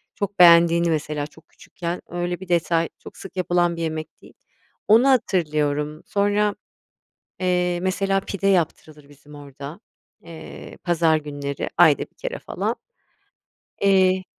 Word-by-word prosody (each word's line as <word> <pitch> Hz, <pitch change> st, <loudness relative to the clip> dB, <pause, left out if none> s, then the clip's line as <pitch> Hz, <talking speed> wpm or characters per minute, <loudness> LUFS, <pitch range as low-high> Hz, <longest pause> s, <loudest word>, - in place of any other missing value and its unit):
çok 200 Hz, -1 st, -4 dB
beğendiğini 170 Hz, -1 st, +6 dB
mesela 150 Hz, -2 st, -2 dB
çok 160 Hz, +1 st, -21 dB
küçükken 170 Hz, 0 st, -6 dB
öyle 175 Hz, 0 st, -3 dB
bir 190 Hz, -1 st, -11 dB
detay 170 Hz, -1 st, +1 dB
çok -, -, -13 dB
sık 190 Hz, 0 st, -11 dB
yapılan 175 Hz, -1 st, +1 dB
bir 165 Hz, -, -6 dB
yemek 155 Hz, -1 st, -5 dB
değil, -, -, -16 dB, 0.5 s
onu 230 Hz, +6 st, +6 dB
hatırlıyorum. 150 Hz, -, 0 dB
Sonra, 205 Hz, +1 st, +1 dB, 0.9 s
eee, 180 Hz, -1 st, 0 dB
mesela 195 Hz, +1 st, 0 dB
pide 195 Hz, 0 st, -4 dB
yaptırılır 155 Hz, -5 st, -1 dB
bizim 145 Hz, +1 st, -17 dB
orada, 145 Hz, +4 st, -10 dB, 0.4 s
eee, 165 Hz, -1 st, -11 dB
pazar 165 Hz, -2 st, +3 dB
günleri 145 Hz, -2 st, -5 dB
ayda 160 Hz, -5 st, +6 dB
1 -, -, -10 dB
kere -, -, -5 dB
falan. -, -, -3 dB, 1.0 s
Eee. 190 Hz, -1 st, +3 dB
170 Hz, 130 wpm, -22 LUFS, 155-190 Hz, 1.0 s, beğendiğini